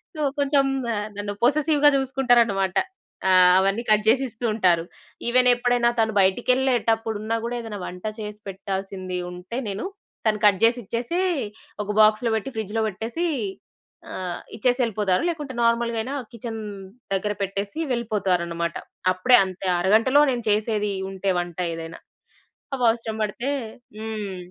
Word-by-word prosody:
So, 305 - -4 0.2
కొంచెం 280 0 +3 0.3
ఆహ్, 210 0 -2
నన్ను 205 0 -3
పొసెసివ్‌గా 295 +2 +4
జూసుకుంటారనమాట. 240 -8 +2 0.5
ఆ! - - +5 0.3
అవన్నీ 195 +4 +1
కట్ 215 0 +4
జేసి 255 +4 +4
ఇస్తూ 225 +2 -6
ఉంటారు. 180 -6 +3 0.5
ఈవెనెప్పుడైనా 245 -1 +3
తను 220 -1 0
బయటికెళ్ళేటప్పుడున్నా 225 0 +1
గూడా, 240 - -3
ఏదన్నా 220 -3 -6
వంట 180 +2 -9 0.2
చేసి 210 -1 -6
పెట్టాల్సింది 190 -1 -4
ఉంటే 180 +6 -7
నేను, 200 - -4 0.4
తను 210 -1 +2
కట్ 200 0 +4
జేసిచ్చేసీ, 235 - +1 0.6
ఒక 205 - -3
బాక్స్‌లో 215 +2 +4
బెట్టి 220 +5 -5
ఫ్రిడ్జ్‌లో 220 +1 -1
బెట్టేసీ 230 - -3 0.8
ఆహ్, 180 -2 -4 0.2
ఇచ్చేసెళ్ళిపోతారు, 220 -5 +1
లేకుంటే 300 -5 -4
నార్మల్‌గాయిన 235 +1 +1 0.2
కిచెన్ 230 -1 -6 0.5
దగ్గర 205 +2 0
పెట్టేసి 200 +6 -3
వెళ్ళిపోతారనమాట. 180 -7 -1 0.4
అప్పుడే 245 +7 +5
అంతే, 190 0 -7
ఆ - - +2
అరగంటలో 225 +9 +4
నేను 240 -2 -3
చేసేదీ 210 -1 +1 0.2
ఉంటే 195 0 -1
వంట 175 -1 -5 0.2
ఏదైనా. 165 0 -7 0.8
అవవసరం 230 -3 +1
బడతే 235 +6 -2 0.5
హ్మ్. 215 -3 -4
220 Hz, 120 wpm, -24 LUFS, 195-245 Hz, 0.8 s, ఆ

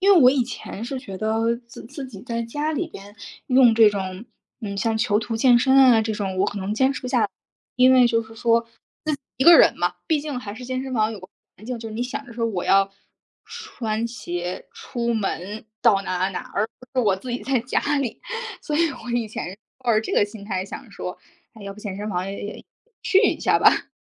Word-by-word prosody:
因 400 +1 +6
为 350 - +7
我 250 - +8
以 265 -2 +2
前 235 -3 -7
是 265 +2 -4
觉 195 -6 -8
得， 225 +2 +1
自 235 - -11
自 275 +1 -7
己 205 -6 -11
在 235 -2 -3
家 295 +7 -2
里 340 +3 -1
边 205 -7 -12 0.3
用 250 -3 +6
这 220 -2 +7
种 190 +1 -5 0.4
嗯， 200 -2 -5
像 225 +2 0
囚 215 -2 +2
徒 225 0 -3
健 245 0 +5
身 265 +2 +3
啊 255 -4 +7
这 220 0 -2
种 195 -3 -3
我 - - +3
可 205 - -4
能 195 +2 -3
坚 265 +4 +3
持 - - -6
不 250 - -4
下 250 -2 +2
来， - - +1 0.5
因 255 +1 +6
为 250 -2 +6
就 230 -1 +1
是 225 0 -14
说 230 0 +3
自 230 - -27
己 - - -31 0.6
一 265 - +1
个 340 +1 +10
人 - - +6
嘛， - - 0
毕 315 -3 +2
竟 290 -4 -4
还 205 -5 -7
是 250 - -8
健 255 +1 -3
身 265 -1 -5
房 215 -1 +2
有 210 - -7
个 185 - -12 0.3
环 215 - -14
境， 250 0 -4
就 225 - -7
是 215 - -7
你 240 - -1
想 280 +3 -5
着 240 - -11
说 230 0 -1
我 185 -5 -3
要 195 0 +3 0.5
穿 235 - -4
鞋 175 -6 -5
出 245 - -3
门 205 0 -3 0.2
到 210 -5 +4
哪 185 -2 -2
儿 190 - +2
哪 - - -4
儿， 205 - 0
而 220 - 0
不 255 +1 -4
是 - - +2
我 195 - +4
自 245 +5 -7
己 245 - -3
在 265 -2 +1
家 245 +3 0 0.2
里， 250 -5 -4 0.4
所 300 - -3
以 335 +1 +4
我 245 -2 -9
以 240 -2 0
前 190 -2 -6 0.2
抱 245 -2 +1
着 215 - +4
这 - - -4
个 - - +4
心 205 -1 -11
态 190 -3 -2
想 235 +4 -9
说， 180 - -6 0.4
那 220 -3 -13
要 200 0 -6
不 210 - -13
健 205 -3 -5
身 210 +1 -4
房 180 -1 -2
也 200 - -6
也 210 - -8 0.4
去 385 - +4
一 - - +2
下 - - +3
吧。 - - +4
230 Hz, 270 characters per minute, -23 LUFS, 205-255 Hz, 0.6 s, 个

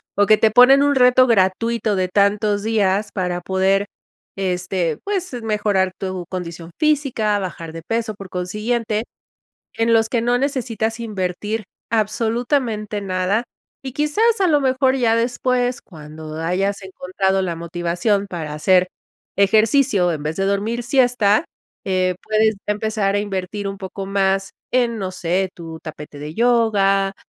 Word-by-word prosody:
o 205 - +4
que 215 +1 +5
te 220 0 +3
ponen 250 +5 +7
un 285 0 +2
reto 255 0 +5
gratuito 220 +1 +1
de 185 0 +1
tantos 205 +2 +1
días 210 -2 +1
para 180 -2 -2
poder, 190 +2 +1 0.5
este, 180 -3 -1
pues, 380 -6 -3
mejorar 210 -3 +1
tu 185 -2 -4
condición 170 -2 -6
física, 275 -9 +1
bajar 170 -4 -6
de 165 - -7
peso, 225 +3 -2
por 195 -1 -10
consiguiente, 210 +5 -2 0.7
en 230 0 +1
los 225 -1 +3
que 235 0 0
no 245 +1 +2
necesitas 235 -4 -2
invertir 210 0 -3 0.3
absolutamente 225 0 -1
nada, 190 +2 0 0.4
y 265 -1 -6
quizás 415 +11 +1
a 380 - +4
lo 300 -4 +3
mejor 260 0 +2
ya 235 -4 +2
después, 245 +1 0
cuando 155 -2 -10
hayas 195 +4 -1
encontrado 190 0 -1
la 175 -3 -2
motivación 175 +4 -1
para 160 -5 -5
hacer 180 +4 +3 0.5
ejercicio 215 -1 +3
en 155 -2 -5
vez 155 +2 -3
de 195 - 0
dormir 210 +5 -1
siesta, 245 -2 +3 0.4
eh, 185 -1 +1
puedes 215 0 +2
empezar 210 -1 0
a - - +2
invertir 205 0 -4
un 195 0 -4
poco 195 0 -6
más 195 0 0 0.2
en, 240 -2 +1
no 190 -2 -3
sé, 185 +1 -1
tu 165 -1 -9
tapete 150 -2 -9
de 150 +2 -7
yoga, 205 -4 +2
205 Hz, 145 wpm, -20 LUFS, 185-230 Hz, 0.7 s, ponen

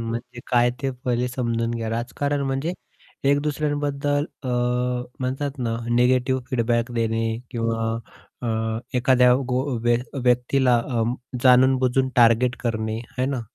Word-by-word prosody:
म्हणजे 120 +2 -5
काय? 120 -1 +3
ते 135 - 0
पहिले 125 0 0
समजून 115 -2 -1
घ्या. 115 -1 -3
राजकारण 140 +5 -2
म्हणजे 135 +5 -1 0.6
एक 145 - +4
दुसऱ्यांबद्दल 145 -1 -1 0.2
अ, 130 - -4 0.7
म्हणतात 135 +2 -3
ना, 115 -2 -1 0.2
निगेटिव्ह 130 +2 +3
फीडबॅक 120 -1 0
देणे 115 -1 0
किंवा 115 -1 -1 0.5
अ, - - -2 0.5
एखाद्या 125 0 +5 0.2
गो 125 +1 +1 0.2
व्य 120 0 +4 0.3
व्यक्तीला 125 +1 +3
अं, 120 -1 0 0.3
जाणून-बुजून 130 0 +4
टार्गेट 120 +1 +4
करणे, 110 -2 -2 0.2
है 130 - +2
ना. 135 -2 -2
125 Hz, 125 wpm, -23 LUFS, 115-130 Hz, 0.7 s, एखाद्या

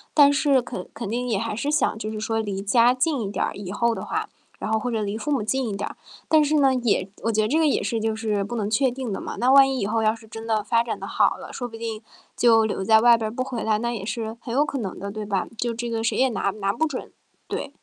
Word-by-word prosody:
但 285 -1 +7
是 270 -2 +3
肯 185 -6 -7
肯 - - -5
定 245 +3 -2
也 210 - +1
还 225 0 -2
是 280 +6 -2
想， 295 -7 +2
就 215 - -4
是 220 - -5
说 225 +1 -1
离 200 -3 -3
家 230 +4 +5
近 260 +1 0
一 200 -1 -3
点 - - 0
儿， - - -4
以 195 -2 -7
后 235 +3 +1
的 - - -5
话， - - -3 0.3
然 215 - -3
后 220 - +2
或 245 - -3
者 225 -2 -1
离 205 +1 -2
父 295 - -5
母 260 -7 +1
近 260 +2 0
一 200 - -3
点。 205 - -3 0.4
但 310 -1 +5
是 300 +1 +1
呢， 270 -3 +4
也 220 -6 0
我 230 - +1
觉 215 - +2
得 215 - +1
这 310 +7 +2
个 315 - +4
也 - - +1
是 230 -2 -1
就 220 0 -1
是 215 -2 -1
不 240 +4 -5
能 210 -2 -1
确 260 +4 +3
定 250 -3 -5
的 - - -3
嘛。 - - -5
那 250 +2 +3
万 275 0 +7
一 265 -1 -1
以 - - 0
后 225 +2 0
要 215 +1 +2
是 220 -1 -16
真 225 +1 -8
的 215 -2 +1
发 230 +2 +2
展 235 - -4
得 - - -6
好 - - +2
了， - - -9
说 245 - -4
不 225 - -11
定 225 -1 -5 0.4
就 225 -2 +5
留 200 -2 -2
在 220 +2 +6
外 235 -1 +7
边 220 0 -3
不 255 - -1
回 255 -3 -4
来， 215 -1 +2
那 235 +1 -1
也 200 -3 -5
是 225 0 -4
很 235 - -6
有 285 +4 +3
可 280 - -4
能 200 -7 -4
的， 200 +1 -5
对 215 0 -5
吧？ 200 -2 -1
就 240 -1 -1
这 240 +1 -4
个 225 -1 -2
谁 230 - 0
也 265 0 +3
拿 210 -3 -1
拿 200 -1 -1
不 315 +8 0
准， 270 -4 -6 0.4
对。 - - -4
230 Hz, 325 characters per minute, -24 LUFS, 215-255 Hz, 0.4 s, 但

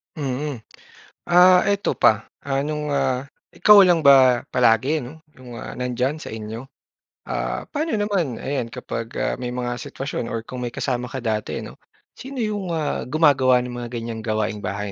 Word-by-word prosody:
Mm. 140 -2 -3 0.7
Ah, 180 +1 +6
eto 200 0 +1
pa, 110 0 +4 0.2
ah, 135 0 0
nung, 150 0 -3
ah, 135 -2 0 0.2
ikaw 210 -1 +7
lang 175 -3 +4
ba 130 -4 +6
palagi 125 +5 +3
'no, 140 +7 -10 0.2
yung, 125 -2 -10
ah, - - -8
nandiyan 125 +3 -1
sa 155 - -9
inyo? 110 +2 -6 0.6
Ah, - - -3
paano 310 -1 -1
naman, 200 - -1
ayan, 130 -1 -3
kapag, 115 0 -6
ah, - - -1
may 125 -1 -4
mga 120 0 -3
sitwasyon 135 -3 -5
or 115 -1 -4
kung 125 +2 -8
may 125 - -3
kasama 125 -2 -2
ka 130 0 -6
dati 110 -2 -2
'no? - - -11 0.3
Sino 265 -2 -6
yung, 205 -5 -2
ah, 155 -5 -2
gumagawa 130 -4 +4
ng 125 - -6
mga 120 - -5
ganyang 115 -1 -5
mga 110 - -9
gawaing 110 0 -1
bahay, 100 0 -4
130 Hz, 175 wpm, -22 LUFS, 120-155 Hz, 0.7 s, ikaw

